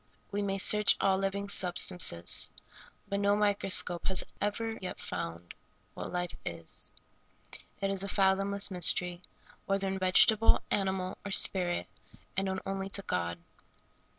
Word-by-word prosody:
We 205 0 -2
may 195 -1 -2
search 210 +2 +5
all 190 -1 +2
living 195 +1 -2
substances, 175 - +1 0.6
but 200 0 -2
no 200 0 +2
microscope 200 -4 +1
has 190 - +2 0.2
ever 225 +2 -2
yet 185 - -6
found 85 0 -6 0.4
what - - -7
life 180 0 -3
is. - - -2 0.9
It 195 -1 -1
is 195 -1 0
a 200 - -4
fathomless 195 +1 +1
mystery, 180 -1 +3 0.5
whether 195 0 0
in 190 0 -2
vegetable, 205 +4 +4
animal, 190 -2 -1
or 200 - -6
spirit, 180 -2 +4 0.5
and 195 +1 0
known 190 0 -3
only 195 0 -4
to 200 0 -2
God. 85 - -2
195 Hz, 135 wpm, -30 LUFS, 180-200 Hz, 0.9 s, search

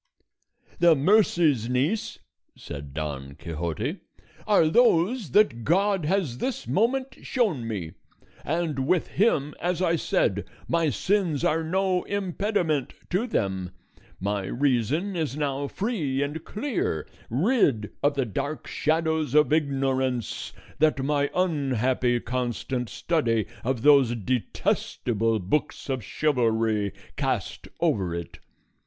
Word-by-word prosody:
"The 170 -2 +6
mercies, 155 - +3
niece," 140 - 0 0.4
said 70 -1 -8
Don 70 -2 -5
Quixote, 85 - -4 0.5
"are 200 -7 +5
those 210 - +3
that 125 - +3
God 190 - +2
has 160 -8 0
this 265 - -3
moment 260 +6 0
shown 190 - 0
me, 95 -8 -4 0.5
and 155 -4 -1
with 180 0 +2
him, 150 -9 +1
as 175 0 0
I 170 -2 +2
said, - - 0 0.2
my 165 -2 +2
sins 175 - 0
are 160 +1 +2
no 185 +2 +1
impediment 190 - -1 0.2
to 195 +8 +1
them. 95 - -1 0.5
My 100 0 -1
reason 140 - 0
is 155 -4 -2
now 140 -1 -1
free 155 - -1
and 150 +3 -4
clear, 210 - -2 0.2
rid 135 - +2
of 145 0 +2
the 135 -2 +1
dark 140 +8 -4
shadows 160 -2 0
of 150 0 +5
ignorance 135 -5 0 0.3
that 150 -3 +3
my 145 0 +1
unhappy 130 -8 +1
constant 125 0 -3
study 115 -10 0 0.2
of 125 -1 -1
those 140 -5 +6
detestable 115 0 -1
books 110 +10 -2
of 130 -4 -2
chivalry 115 -7 +1 0.3
cast - - -2
over 90 -4 +1
it. 85 0 -7
145 Hz, 115 wpm, -26 LUFS, 115-175 Hz, 0.5 s, The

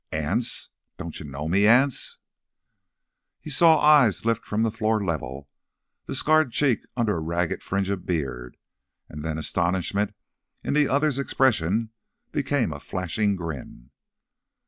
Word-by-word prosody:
"Anse! - - -1 0.3
Don't 85 - -7
you 75 - -8
know 70 +2 -5
me, 100 +5 +3
Anse?" 125 +4 +3 1.2
He 155 - -8
saw 160 +2 +5
eyes 145 -9 +5
lift 115 -1 +1
from 105 +2 -1
the 115 - +1
floor 110 -1 0
level, 70 -5 -4 0.6
the - - -3
scarred 155 -4 +3
cheek 130 -1 +2 0.2
under 110 -6 +1
a - - -2
ragged 85 +2 -2
fringe 100 0 -2
of 95 -2 -3
beard; 65 -8 -4 0.5
and 75 0 -8
then 80 -1 -3
astonishment 95 +6 -1 0.5
in - - -1
the 150 -1 +3
other's 140 0 +1
expression 115 -5 +1 0.4
became 135 - 0
a 70 - -8
flashing 100 +5 -1
grin. 75 -8 -8
100 Hz, 140 wpm, -25 LUFS, 80-130 Hz, 1.2 s, saw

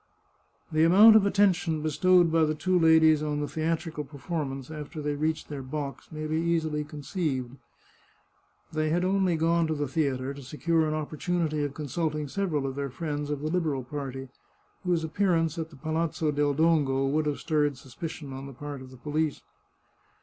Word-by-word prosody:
The 155 0 +3
amount 205 +7 +8
of 205 -2 +6
attention 180 -6 +2
bestowed 175 +2 +4
by 165 0 +4
the 155 0 -1
two 185 +3 +1
ladies 160 -2 +5
on 150 -1 -1
the 145 - -2
theatrical 160 0 -2
performance 140 0 -5
after 155 +1 -7
they 150 0 -1
reached 155 +2 -1
their 145 -2 -5
box 140 +3 -6
may 155 0 -5
be 155 +1 -1
easily 160 -2 0
conceived. 145 -4 -3 1.2
They 155 0 0
had 175 +3 +1
only 190 -2 +2
gone 165 +1 +2
to 155 - -1
the 145 -1 -2
theatre 135 -2 -1
to 140 - -10
secure 155 +5 0
an 155 - -1
opportunity 155 0 -1
of 145 -1 -3
consulting 150 0 -2
several 155 -4 -1
of 135 - -2
their 140 0 -3
friends 145 +1 -4
of 145 -1 -2
the 155 +1 -2
Liberal 155 -7 0
party, 135 -1 -6 0.5
whose 175 -3 +1
appearance 165 -1 +1
at 160 0 -4
the 160 - -14
Palazzo 155 +1 -1
del 145 -1 +1
Dongo 145 -4 +2
would 150 +3 +1
have 145 - -1
stirred 150 -3 0
suspicion 140 +2 -7
on 135 +1 -7
the 135 - -9
part 145 +1 -7
of 130 - -10
the 130 - -13
police. 150 +3 -2
155 Hz, 180 wpm, -28 LUFS, 145-165 Hz, 1.2 s, amount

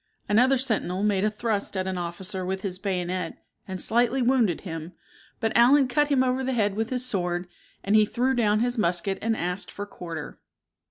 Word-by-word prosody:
Another 250 +6 +4
sentinel 215 -7 -1
made 205 -2 +2
a 215 - +3
thrust 210 -2 -2
at 185 - -1
an 190 0 -2
officer 180 +2 -4
with 190 +1 -3
his 185 -2 -4
bayonet, 180 -3 -2 0.3
and 190 -1 -5
slightly 240 +6 +3
wounded 240 -8 +2
him, 165 -1 -7 0.5
but 225 - -1
Allen 260 +3 +6
cut 295 +4 +2
him 275 -3 +3
over 255 +1 0
the 260 0 -1
head 205 -4 +1
with 220 +2 -2
his 250 -1 +1
sword, 180 -5 -1 0.4
and 200 +2 +2
he 215 - +7
threw 250 +4 0
down 215 -3 +2
his 245 0 0
musket 180 +1 0
and 225 0 0
asked 180 +3 -3
for 205 - -6
quarter. 165 -6 -8
205 Hz, 195 wpm, -26 LUFS, 185-245 Hz, 0.5 s, he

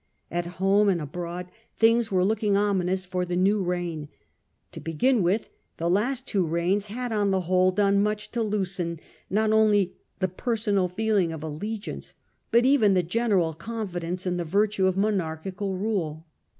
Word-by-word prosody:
At 175 0 -2
home 200 +2 +4
and 180 -3 +1
abroad 175 +4 -6 0.3
things 230 0 +3
were 185 -1 +3
looking 210 -1 +1
ominous 190 -2 +1
for 180 0 -2
the 180 0 -3
new 195 +3 +2
reign. 175 -4 -3 0.6
To - - -8
begin 180 - +1
with, 190 +5 0 0.3
the 170 +1 0
last 245 +7 0
two 200 -6 +1
reigns 175 +5 0
had 245 +3 -4
on 205 -2 +1
the 190 -1 +1
whole 185 +1 +3
done 200 +1 +3
much 210 0 -2
to 235 - -1
loosen 190 -6 -1 0.3
not 215 +2 +2
only 210 -4 +3 0.2
the 185 - 0
personal 205 0 0
feeling 200 -2 +1
of 160 -2 -6
allegiance, 205 +8 -5 0.3
but 235 +1 +4
even 235 -8 +4
the 180 - +3
general 185 -3 +1
confidence 180 -2 -4
in 180 -1 0
the 175 - -1
virtue 200 +3 +1
of 190 0 0
monarchical 190 -1 -1
rule. 175 -7 -2
190 Hz, 165 wpm, -26 LUFS, 175-210 Hz, 0.6 s, home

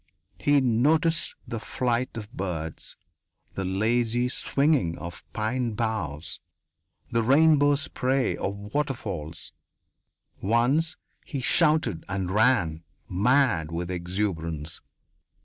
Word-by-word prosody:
He 145 0 +4
noticed 155 +7 +2
the 115 - -4
flight 120 +1 -1
of 105 0 -7
birds, 80 -4 -4 0.6
the 95 - -3
lazy 115 +5 +1
swinging 135 - +1
of 85 0 -8
pine 115 +2 -1
boughs, 105 -9 -3 0.7
the 115 - +2
rainbow 145 +3 +5
spray 135 -2 0
of 100 +1 -5
waterfalls. 100 - -3 0.9
Once 125 - +2 0.3
he 140 - -5
shouted 150 - +2
and 95 -1 -2
ran, 105 -8 +3 0.3
mad 100 - +2
with 85 +2 -3
exuberance. 85 -4 -3
115 Hz, 95 wpm, -26 LUFS, 90-135 Hz, 0.9 s, rainbow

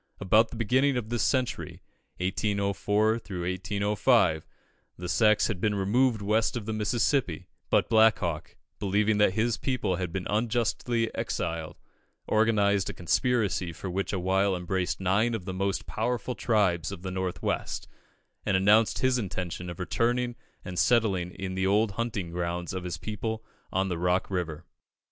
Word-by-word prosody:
About 110 +4 +4
the - - -9
beginning 130 +4 +2
of 110 -3 -4
this 120 -1 -1
century 130 -3 -1 0.3
(1804 105 +3 0 0.8
5), 100 -9 +3 0.5
the 90 - -6
Sacs 110 +3 +4
had 95 -5 -4
been 105 -1 +1
removed 110 +3 +2
west 110 +3 +1
of 110 - -5
the 110 - -3
Mississippi; 110 - 0 0.2
but - - +3
Black 110 -1 +5
Hawk, 85 -4 -4 0.2
believing 105 +2 +1
that 105 -3 +4
his 115 +2 +1
people 125 -9 -1
had 90 -3 -3
been 90 +1 -3
unjustly 115 +1 0
exiled, 80 -1 -3 0.5
organised 105 -3 +2
a - - -6
conspiracy 100 -1 0
which 95 +4 -3
for 100 - -1
a - - -2
while 95 +2 +2
embraced 90 +1 -2
nine 100 +5 +2
of 95 -5 -6
the 95 - -4
most 95 +1 -1
powerful 120 +2 -2
tribes 100 -9 +1
of 95 -3 -8
the 95 - -4
North 95 -1 -3
West, - - -2 0.6
and 100 -2 +2
announced 105 +3 +4
his 130 -1 +2
intention 90 -4 -4
of 85 - -8
returning 120 +6 0 0.3
and 90 -2 -4
settling 105 -7 +2
in 95 +1 -6
the 95 0 0
old 105 +2 +3
hunting 105 -5 -3
grounds 85 0 -3
of 90 -1 -4
his 85 -2 -3
people 110 +3 -4 0.3
on 95 +1 +1
the 90 -3 -3
Rock 90 +2 +1
River. 85 -3 -3
100 Hz, 160 wpm, -28 LUFS, 90-110 Hz, 0.8 s, Black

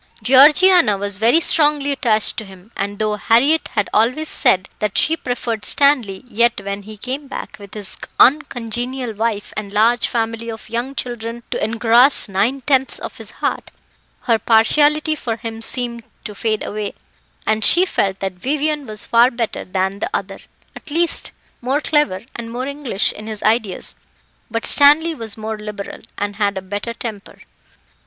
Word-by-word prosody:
Georgiana 295 - +6
was 200 0 -4
very 235 +9 +4
strongly 295 -3 +2
attached 225 -6 +1
to 220 - -4
him; 195 +1 -15
and 200 +1 -4
though 215 0 -1
Harriett 265 +10 +3
had 210 -2 +1
always 255 +8 +1
said 190 0 +3
that 210 -2 -2
she 320 - +3
preferred 240 - -4
Stanley, 250 -5 +2
yet, 235 -1 +1
when 200 0 -4
he 215 +1 -11
came 265 +6 -5
back, - - -7
with 200 0 -12
his 205 -2 -4 0.2
uncongenial 245 -2 +1
wife 215 -1 -3
and 205 -2 -5
large 225 +4 +2
family 230 0 -3
of 220 -1 -9
young 245 +4 -3
children 235 -2 -5
to - - -2
engross 230 +5 +4
nine 215 +8 0
tenths 265 0 +1
of - - -8
his - - -10
heart, - - -4 0.5
her 230 -3 +1
partiality 295 +9 +3
for 235 -7 -4
him 225 0 -7
seemed 235 0 -2 0.2
to 210 - -7
fade 215 +1 -2
away, 210 -1 -5 0.5
and 220 0 0
she 355 - +5
felt 195 - -1
that 190 -1 -3
Vivian 290 +7 -2
was 215 -1 -2
far 235 +2 +4
better 235 -3 -4
than 190 +1 -2
the 285 - -2
other - - -4 0.4
at - - -9
least, 335 +3 +2 0.3
more 265 +4 0
clever 295 -11 0
and 230 -1 -7
more 250 +2 -4
English 280 -7 -1
in 215 - -10
his 215 -2 -6
ideas; 215 -2 0 0.6
but 230 0 -3
Stanley 305 +3 +6
was 225 -7 -4
more 220 0 -5
liberal, 210 -1 -7 0.2
and 205 0 -4
had 200 -2 0
a - - -3
better 205 +4 -5
temper. 215 -4 -8
230 Hz, 165 wpm, -18 LUFS, 210-270 Hz, 0.6 s, Georgiana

